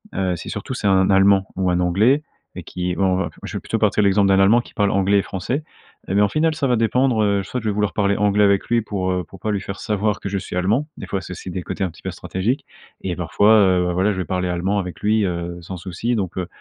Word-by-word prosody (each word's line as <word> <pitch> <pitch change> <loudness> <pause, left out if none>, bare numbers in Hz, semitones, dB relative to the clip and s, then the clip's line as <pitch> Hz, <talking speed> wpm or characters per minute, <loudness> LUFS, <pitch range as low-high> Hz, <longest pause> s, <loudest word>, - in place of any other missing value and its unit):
Heu, 90 -2 0
si, - - -8
surtout - - -5
c'est 100 - -2
un 95 0 +3
Allemand 95 0 +4
ou 95 -1 +1
un 90 0 +1
Anglais 110 +12 +3 0.3
et - - -6
qui, 90 0 -3
bon, 95 - +1
on 95 -1 +2
va 85 -4 -1
je - - -5
vais - - -3
plutôt - - -3
partir - - +2
de - - +3
l'exemple 100 0 +3
d'un 95 0 +4
Allemand 110 +5 +5
qui - - -17
parle 100 -1 +2
anglais 100 +1 +2
et - - +4
français 125 - -3 0.5
et - - -1
ben, 105 - +5
au - - +1
final, 155 +8 +1
ça 140 -2 -1
va 125 - +2
dépendre. 115 0 +2
Heu, 100 -1 +1
soit 125 +5 -4
je 110 - -1
vais - - 0
vouloir 105 -4 0
parler 100 -1 +1
anglais 105 0 +3
avec 100 -1 +3
lui 120 -1 +2
pour, 95 -3 -3
heu, 90 -1 -1
pour 95 - -14
pas 105 +4 -2
lui 100 - -1
faire 100 0 -7
savoir 105 0 -1
que - - -6
je 100 - -2
suis 90 -1 -6
Allemand. 110 +11 +1
Des - - -8
fois, 95 -1 -2
c'est 90 - -9
aussi 90 - -7
des 90 0 -4
côtés 95 - -4
un - - -3
petit 80 - -16
peu - - -3
stratégiques 110 +9 -2 0.4
et - - -3
parfois, 105 +2 +3
heu, 90 -2 +3
bah, 90 - -1
voilà, 95 +4 +2
je 95 - -4
vais 95 - -2
parler 90 -1 -2
allemand 95 +4 0
avec 90 -3 -5
lui, 110 0 +2
heu, 85 -1 -3
sans 90 +2 -7
souci. 95 +7 -3
Donc 95 -3 -3
heu, 90 - -2
100 Hz, 290 wpm, -21 LUFS, 90-105 Hz, 0.5 s, Allemand